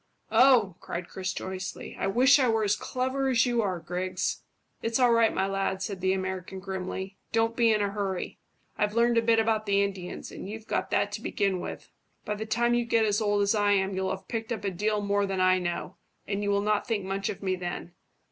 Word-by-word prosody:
"Oh!" 240 -9 +5
cried 170 0 -5
Chris 190 0 -3
joyously. 190 0 -6
"I - - 0
wish 255 +8 +5
I 255 -3 +3
were 225 -1 +2
as 205 0 +2
clever 260 +4 -1
as 245 -2 +4
you 240 -2 +1
are, 185 -4 -1
Griggs." 180 +2 -2 0.4
"It's 230 +2 0
all 250 -2 +5
right, 230 -1 +4
my 190 - 0
lad," 195 -1 -1
said 190 -1 -4
the 190 0 +2
American 190 0 -3
grimly; 190 0 -5
"don't 225 0 +1
be 230 -2 +4
in 210 -1 +2
a 200 - -1
hurry. 195 -3 -3 0.4
I've 210 +1 +1
learned 235 0 +4
a - - +1
bit 230 0 +3
about 220 -1 +1
the 200 0 +3
Indians, 190 -3 -5
and - - -7
you've 220 +1 -7
got - - -1
that 205 - +1
to 210 +1 -5
begin 195 -4 0
with; - - -7 0.3
by 210 - -1
the 220 +1 -5
time 235 +2 +2
you 240 0 +2
get 230 -1 +2
as 210 0 +1
old 205 -1 +2
as 200 - +2
I 205 -1 +3
am 195 0 +1
you'll 190 0 -1
have 190 0 -5
picked 225 0 -4
up 225 - -3
a 200 - -1
deal 210 +3 0
more 200 0 +1
than 195 -1 -2
I 185 0 +4
know, 175 +1 -4 0.3
and 200 0 -2
you 205 - -1
will 200 0 +2
not 210 0 0
think 215 -5 -1
much 195 +1 -2
of 200 - -6
me 185 -1 +1
then. 175 -1 -5
205 Hz, 235 wpm, -28 LUFS, 190-225 Hz, 0.4 s, Oh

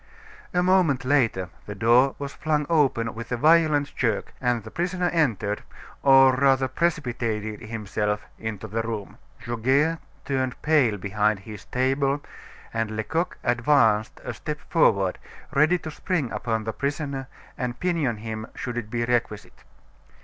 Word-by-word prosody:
A 180 0 +2
moment 175 -8 +3
later 115 -9 +2 0.2
the 105 - -5
door 120 +6 +4
was 140 -1 -5
flung 150 -1 0
open 135 -7 +2
with 115 +1 -8
a 125 - 0
violent 155 0 +3
jerk, 115 -5 -1
and 120 -3 +1
the 110 - -10
prisoner 180 +1 -1
entered, 115 - 0 0.4
or 135 -1 +7
rather 135 0 +3
precipitated 120 -8 -2
himself 105 -1 -2
into 110 -1 -5
the 110 +2 -2
room. 110 -3 -5 0.3
Goguet 135 +8 +1 0.3
turned 130 -2 -1
pale 140 -9 +3
behind 105 +1 0
his 105 -2 -10
table, 135 +2 +1 0.5
and 110 -1 -2
Lecoq 160 +10 -1
advanced 120 -3 +2
a 120 - -4
step 150 +8 -5
forward, 100 - +3 0.3
ready 155 +6 +4
to 160 -2 -7
spring 155 - -2
upon 110 -2 -2
the 110 0 -3
prisoner 140 -1 -3 0.3
and 125 -1 -4
pinion 165 -10 0
him 110 0 -6
should 120 -2 -5
it 110 -3 -4
be 120 +1 -1
requisite. 120 -3 -2
125 Hz, 140 wpm, -25 LUFS, 110-145 Hz, 0.5 s, or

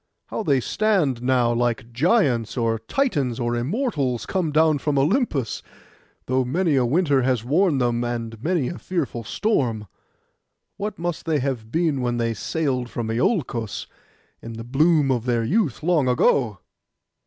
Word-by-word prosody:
How - - -3
they 140 -10 +2
stand 165 - +1
now 125 -2 +2
like 120 -1 -1
Giants, 135 - +2
or 115 -2 0
Titans, 140 - -1
or 120 0 -1
Immortals 140 - -1
come 180 -5 -1
down 155 -1 +3
from 145 0 -1
Olympus, 150 - 0 0.6
though 130 +1 +1
many 160 +5 +1
a 125 -2 +2
winter 145 -1 +2
has 125 -3 +1
worn 155 +4 +2
them, 120 -2 +1
and 115 -2 -4
many 165 -5 +1
a 175 - -5
fearful 140 -10 -3
storm. 115 - -1 0.9
What 210 0 -4
must 175 -1 -4
they 160 -2 +2
have 125 -5 -3
been 160 -4 +1
when 120 -1 -1
they 115 -1 0
sailed 130 0 -2
from 115 -2 -3
Iolcos, 120 - -1 0.6
in 115 - -8
the 115 0 -7
bloom 145 +3 +3
of 120 -2 -1
their 120 -2 +1
youth, 155 - 0
long 160 -5 +2
ago? 125 -3 +2
130 Hz, 155 wpm, -23 LUFS, 120-160 Hz, 0.9 s, down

